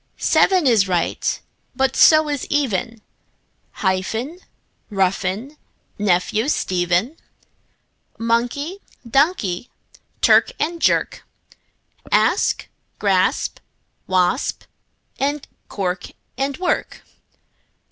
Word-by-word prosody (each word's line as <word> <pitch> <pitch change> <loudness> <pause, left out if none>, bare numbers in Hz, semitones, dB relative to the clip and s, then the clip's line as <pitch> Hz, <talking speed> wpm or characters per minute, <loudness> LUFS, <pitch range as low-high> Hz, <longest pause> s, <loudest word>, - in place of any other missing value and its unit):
Seven 370 -4 +3
is 225 -6 +4
right, 175 -3 -1 0.4
but 265 0 +1
so 310 -1 +6
is 290 -3 -3
even; 230 -5 -1 0.8
Hyphen, 220 - -1 0.5
roughen, 195 +7 -1 0.4
nephew, 205 +4 +1
Stephen; 180 - 0 1.0
Monkey, 245 +10 -1 0.3
donkey; 250 - +1 0.5
clerk - - +5
and 335 +2 -2
jerk; - - +1 0.9
Asp, - - +2 0.3
grasp, - - +1 0.5
wasp; 185 +5 +1 0.6
and 285 +1 -1 0.2
cork 185 -2 -3 0.3
and 275 0 -2
work. 365 -1 -2
235 Hz, 75 wpm, -20 LUFS, 190-290 Hz, 1.0 s, so